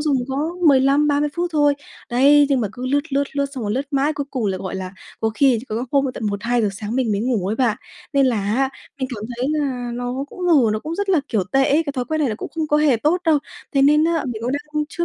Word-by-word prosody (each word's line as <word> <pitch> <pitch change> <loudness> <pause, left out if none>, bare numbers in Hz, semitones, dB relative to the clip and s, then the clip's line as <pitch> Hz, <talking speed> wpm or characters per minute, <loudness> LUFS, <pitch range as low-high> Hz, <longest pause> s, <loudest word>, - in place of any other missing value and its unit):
dùng 295 -3 +1
có 265 - -3 0.3
15-30 285 +2 +3
phút 350 0 -1
thôi, 290 -2 +3 0.4
đấy, 285 +4 +5
nhưng 270 -3 +2
mà 215 - -1
cứ 250 +1 -6
lướt, 285 +3 -1
lướt, 280 +1 +2
lướt 280 0 +1
xong 250 -5 -4
rồi 205 - -1
lướt 265 +5 -2
mãi, 285 +2 +1
cuối 285 -1 -3
cùng 245 -6 -2
là, 190 -1 -1
gọi 185 -1 -5
là, 185 0 -5 0.3
có 220 0 +1
khi 265 -3 +4
rồi 230 +4 -2
có 280 - +4
hôm 260 -2 -2
tận 220 - -3
1:00-2:00 215 +2 0
sáng 210 +3 -5
mình 240 -5 +1
mới 200 - 0
ngủ 225 -6 0
ấy 215 +3 -1
bạn. 235 -5 +1 0.4
Nên 275 -1 +4
là 245 -3 +1 0.2
á 270 +1 +1 0.3
mình 260 - -2
cảm 215 -1 -6
thấy 250 +2 -1
là 265 -5 -2
nó 245 +3 -3
cũng 365 -1 -5
ngủ 275 -11 +4
nó 215 - 0
cũng 315 +8 -5
rất 400 +2 -3
là, 360 -6 +4
kiểu, 210 -6 0
tệ 270 0 +4
ấy, 305 +3 +4
cái 285 - -2
thói 255 -3 -2
quen 315 +6 -2
này 285 - +2
nó 215 - -2
cũng - - -6
không 320 -1 -1
có 295 - +3
hề 300 -4 +4
tốt 305 +10 +1
đâu. 315 -3 +4 0.3
Thế 275 - +3
nên 300 +2 +5
á 330 -2 +1
mình 230 -3 -5
cũng 250 +3 -1
đang 300 +1 -2
chưa 345 - -2
270 Hz, 275 wpm, -21 LUFS, 235-295 Hz, 0.4 s, đấy